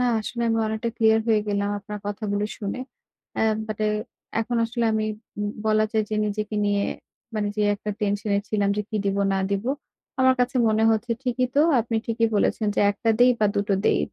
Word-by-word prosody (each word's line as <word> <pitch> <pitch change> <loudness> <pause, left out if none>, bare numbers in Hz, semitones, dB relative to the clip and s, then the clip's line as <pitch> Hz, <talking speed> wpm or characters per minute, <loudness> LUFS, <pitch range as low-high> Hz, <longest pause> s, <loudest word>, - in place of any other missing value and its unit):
না 250 - +3 0.2
আসলে 235 +2 -4
আমি 225 0 +2
অনেকটা 220 +2 -2
ক্লিয়ার 220 0 +4
হয়ে 215 -1 +4
গেলাম 200 0 0
আপনার 210 +1 -7
কথাগুলি 205 0 -2
শুনে। 205 +4 -4 0.6
অ্যা - - +1 0.2
বাট 215 -1 -5 0.6
এখন 240 +1 -2
আসলে 235 0 -2
আমি 215 0 +1 0.4
ব - - 0 0.2
বলা 215 0 +4
যায় 220 -1 +2
যে - - 0
নিজেকে 210 +1 -3
নিয়ে, 205 0 +1 0.5
মানে 210 -1 0
যে 210 - +1
একটা 210 +1 -5
টেনশনে 205 0 0
ছিলাম 205 -2 +1
যে 210 - 0
কি 215 - -1
দিব 195 0 0 0.2
না 195 - +1
দিব। 200 +2 -1 0.6
আমার 260 0 +5
কাছে 255 +1 +1
মনে 220 0 +2
হচ্ছে 225 +2 0
ঠিকই 255 0 0
তো - - +6 0.2
আপনি 225 0 -2
ঠিকই 230 0 +1
বলেছেন 215 +1 +1
যে - - +3
১ 205 - -6
টা 225 - +5
দেই 250 +1 +7
বা 210 - +5
দুটো 200 0 +1
দেই, - - +4
215 Hz, 200 wpm, -24 LUFS, 205-230 Hz, 0.6 s, দেই